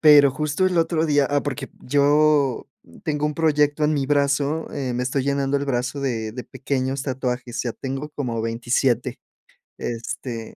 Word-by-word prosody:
pero 145 -3 +8
justo 150 +6 0
el 185 -1 0
otro 165 -1 +2
día 145 -2 +3
Ah, 145 0 +2
porque 145 -4 -4
yo 145 -1 +3 0.4
tengo 150 -1 -1
un 150 -1 0
proyecto 150 -2 +2
en 150 +1 +3
mi 140 -2 0
brazo, 145 +2 +1
eh, 135 -3 -2
me 125 +1 -1
estoy 130 +1 0
llenando 140 0 +1
el 140 - -1
brazo 125 0 -1
de 115 -5 -2
de 125 +2 -6
pequeños 135 0 -2
tatuajes. 125 -3 -3
Ya 120 - -2
tengo 135 +4 -5
como 120 -6 -3
27. 120 +2 0 0.6
Este 115 0 -5
140 Hz, 165 wpm, -23 LUFS, 125-150 Hz, 0.6 s, pero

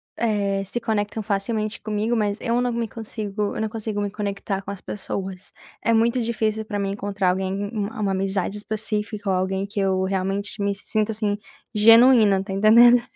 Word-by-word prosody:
eh, 200 -3 0
se 220 +5 -4
conectam, 215 -1 -1
facilmente, 215 +1 -2
comigo, 215 +2 -1
mas 210 -1 0
eu 235 +1 0
não 245 -1 0
me 230 -1 -2
consigo 210 -2 -4
eu - - -4
não 220 - 0
consigo 215 -1 -4
me 205 0 -1
conectar 200 -1 -3
com 200 - -7
as 200 - -7
pessoas, 190 -1 -6 0.3
é 230 - +2
muito 230 +2 +3
difícil 220 -1 -1
para 205 -1 -4
mim 195 0 -1
encontrar 200 -2 0
alguém, 190 +2 -2
u 205 -2 -1
uma 200 -2 0
amizade 195 +1 -1
específica 210 -1 -3
ou 190 - +2
alguém 190 +1 -1
que 205 +1 -12
eu 190 -1 +1
realmente 195 +2 -2
me 200 0 +1
sinto, 215 +2 -1
assim, 210 -1 -1 0.4
genuína, 225 -1 +7
está 195 0 -5
entendendo? 235 +4 +7
205 Hz, 180 wpm, -23 LUFS, 195-220 Hz, 0.4 s, genuína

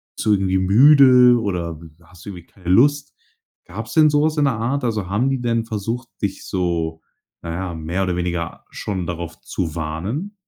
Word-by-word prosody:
zu 110 - 0
irgendwie 95 -2 +2
müde 125 +4 +6
oder, 90 -7 -3
hm, 80 -1 -15
hast 90 +1 -17
du - - -7
irgendwie 90 -4 -10
keine 90 -3 -10
Lust?“ 140 +9 +3 0.5
Gab's 110 +6 -8
denn 155 -1 +5
so 145 0 +2
was 155 0 0
in 145 - +3
der 135 - +2
Art? 125 +4 -2
Also 105 -5 -2
haben 115 +7 +1
die 135 -2 -2
denn 115 -2 0
versucht, 115 +2 -4
dich 100 -2 -3
so 85 -3 -2 0.4
na 85 - -6
ja, 90 0 -4
mehr 80 +4 -3
oder 90 -2 -1
weniger 85 -1 -4
schon 95 -4 -4
darauf 85 -1 -6
zu 80 -4 -4
warnen? 95 - -4
100 Hz, 190 wpm, -20 LUFS, 85-125 Hz, 0.5 s, müde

